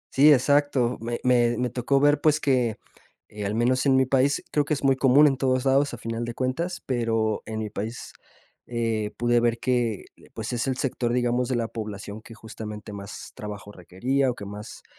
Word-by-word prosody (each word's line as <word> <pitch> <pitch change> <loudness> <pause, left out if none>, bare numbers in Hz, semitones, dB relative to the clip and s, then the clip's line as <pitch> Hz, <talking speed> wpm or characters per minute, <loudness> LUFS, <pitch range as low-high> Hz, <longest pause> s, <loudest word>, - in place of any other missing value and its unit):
Sí, 145 +3 +7
exacto. 140 -2 +2
Me 120 +1 -3
me 120 -2 +3
me 125 -1 -1
tocó 130 +2 +1
ver, 145 0 +3
pues, 155 0 +3
que, 125 -6 +1 0.5
eh, 105 -1 -6
al 105 - -2
menos 130 +4 +2
en 135 - +5
mi 130 0 +4
país 135 +2 +2
creo 150 - +2
que 150 +1 -1
es 140 - -7
muy 135 -1 +4
común 135 +3 +5
en 135 -3 +3
todos 130 0 0
lados 135 -1 +2
a - - -11
final 115 +1 -4
de 120 0 -5
cuentas, 165 +8 -2
pero 115 -4 0
en 110 0 -4
mi 105 -2 -5
país, 110 +4 -6 0.5
eh, 115 -3 -1
pude 120 0 +2
ver 115 0 +1
que, 120 -5 0 0.3
pues, 110 +2 -4
es 120 +2 -1
el 130 -1 -1
sector, 120 -3 -1
digamos, 120 0 +1
de 130 - 0
la 115 -1 -1
población 105 -1 -7
que 115 0 -13
justamente 105 -2 -8
más 100 0 -8
trabajo 105 -1 -8
requería 125 +10 -1
o 125 - -2
que 100 - -8
más 105 +2 -9
120 Hz, 205 wpm, -25 LUFS, 110-135 Hz, 0.5 s, Sí